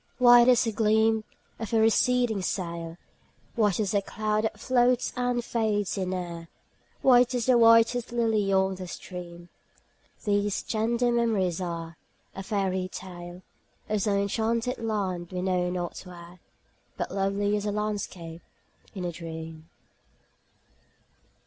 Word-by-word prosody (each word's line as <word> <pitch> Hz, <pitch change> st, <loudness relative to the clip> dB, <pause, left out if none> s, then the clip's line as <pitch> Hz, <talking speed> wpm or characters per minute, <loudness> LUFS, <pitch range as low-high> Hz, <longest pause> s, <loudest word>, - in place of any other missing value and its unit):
White 240 Hz, -1 st, +7 dB
as 250 Hz, -2 st, +5 dB
the 225 Hz, -, -1 dB
gleam 220 Hz, 0 st, +2 dB, 0.3 s
of 225 Hz, 0 st, -5 dB
a 225 Hz, -, +4 dB
receding 230 Hz, -1 st, +2 dB
sail, 170 Hz, -3 st, -4 dB, 0.6 s
White 210 Hz, -5 st, +1 dB
as 205 Hz, -2 st, 0 dB
a 200 Hz, -, +2 dB
cloud 215 Hz, +2 st, -1 dB
that 220 Hz, -, -3 dB
floats 250 Hz, -1 st, +2 dB
and 245 Hz, -1 st, -1 dB
fades 210 Hz, -4 st, 0 dB
in 185 Hz, -2 st, -2 dB
air, 170 Hz, -2 st, -5 dB, 0.6 s
White 250 Hz, -1 st, +5 dB
as 240 Hz, -2 st, -1 dB
the 255 Hz, -, +4 dB
whitest 230 Hz, +1 st, +5 dB
lily 220 Hz, -4 st, +1 dB
on 190 Hz, 0 st, +2 dB
a 185 Hz, -, -6 dB
stream, 175 Hz, -1 st, -9 dB, 0.7 s
These 205 Hz, -1 st, 0 dB
tender 235 Hz, +2 st, 0 dB
memories 210 Hz, -7 st, +1 dB
are; 170 Hz, -2 st, -5 dB, 0.4 s
a 195 Hz, -, -5 dB
fairy 190 Hz, -2 st, -1 dB
tale 175 Hz, -1 st, -9 dB, 0.5 s
Of 215 Hz, -1 st, 0 dB
some 205 Hz, 0 st, +1 dB
enchanted 225 Hz, +5 st, -1 dB
land 195 Hz, -6 st, -3 dB
we 180 Hz, 0 st, -3 dB
know 180 Hz, -1 st, 0 dB
not 175 Hz, -1 st, -4 dB
where, 175 Hz, -1 st, -12 dB, 0.6 s
But -, -, -3 dB
lovely 200 Hz, +1 st, 0 dB
as 210 Hz, 0 st, -2 dB
a -, -, 0 dB
landscape 200 Hz, -5 st, -4 dB, 0.5 s
in 185 Hz, -2 st, -4 dB
a 175 Hz, -, -2 dB
dream. 160 Hz, -1 st, -8 dB
205 Hz, 135 wpm, -27 LUFS, 180-230 Hz, 0.7 s, White